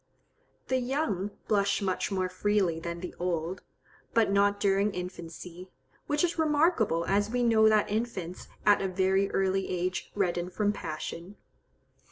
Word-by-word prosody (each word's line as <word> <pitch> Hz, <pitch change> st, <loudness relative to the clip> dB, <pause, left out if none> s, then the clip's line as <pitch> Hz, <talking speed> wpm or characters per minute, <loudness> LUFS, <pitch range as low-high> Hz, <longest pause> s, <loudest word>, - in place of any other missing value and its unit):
The 260 Hz, 0 st, +1 dB
young 245 Hz, -, -1 dB, 0.2 s
blush 200 Hz, -1 st, +2 dB
much 190 Hz, 0 st, -1 dB
more 185 Hz, -1 st, 0 dB
freely 185 Hz, -2 st, +1 dB
than 170 Hz, +1 st, -5 dB
the 180 Hz, -, -6 dB
old, 175 Hz, 0 st, -2 dB, 0.5 s
but 225 Hz, -3 st, +4 dB
not 200 Hz, 0 st, +3 dB
during 200 Hz, +1 st, +2 dB
infancy, 180 Hz, 0 st, -7 dB, 0.4 s
which 295 Hz, +2 st, +1 dB
is 345 Hz, -1 st, 0 dB
remarkable, 295 Hz, -, +2 dB
as 205 Hz, +1 st, +1 dB
we 245 Hz, +1 st, 0 dB
know 220 Hz, -2 st, +5 dB
that 215 Hz, -1 st, +3 dB
infants 205 Hz, -5 st, -3 dB, 0.2 s
at 205 Hz, -1 st, +5 dB
a 195 Hz, -, 0 dB
very 190 Hz, +1 st, +1 dB
early 195 Hz, 0 st, 0 dB
age 180 Hz, 0 st, -2 dB
redden 180 Hz, -3 st, 0 dB
from 205 Hz, +2 st, 0 dB
passion. 170 Hz, +2 st, -6 dB
195 Hz, 145 wpm, -29 LUFS, 180-215 Hz, 0.5 s, know